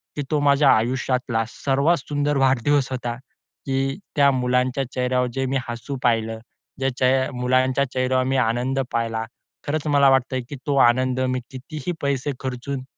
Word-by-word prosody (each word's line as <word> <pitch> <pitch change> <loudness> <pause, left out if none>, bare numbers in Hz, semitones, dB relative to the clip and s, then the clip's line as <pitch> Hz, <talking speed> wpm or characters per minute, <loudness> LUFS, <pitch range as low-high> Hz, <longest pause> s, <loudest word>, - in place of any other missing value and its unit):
की 145 - -2
तो 150 - +2
माझ्या 140 0 +4
आयुष्यातला 125 0 0
सर्वात 140 +7 +1
सुंदर 145 +1 -1
वाढदिवस 135 +1 +2
होता, 120 -2 -3 0.5
की 135 0 -1 0.2
त्या 140 -2 +5
मुलांच्या 125 +1 0
चेहऱ्यावर 125 0 0
जे 135 +1 -1
मी 135 +1 0
हसू 120 +4 -5
पाहिलं, 115 -2 +1 0.4
जे 135 0 +1
चे 130 +1 +2
मुलांच्या 130 +2 +1
चेहऱ्यावर 130 0 +1
मी 135 +1 0
आनंद 125 +4 -1
पाहिला. 115 -1 -1 0.4
खरंच 155 +1 -1
मला 140 -2 +5
वाटतंय 130 -1 +1
की 145 - -6
तो 140 -1 +1
आनंद 130 +1 +1
मी 130 0 0
कितीही 135 +4 -6
पैसे 140 0 -1
खर्चून 130 +1 -4
130 Hz, 155 wpm, -22 LUFS, 125-140 Hz, 0.5 s, त्या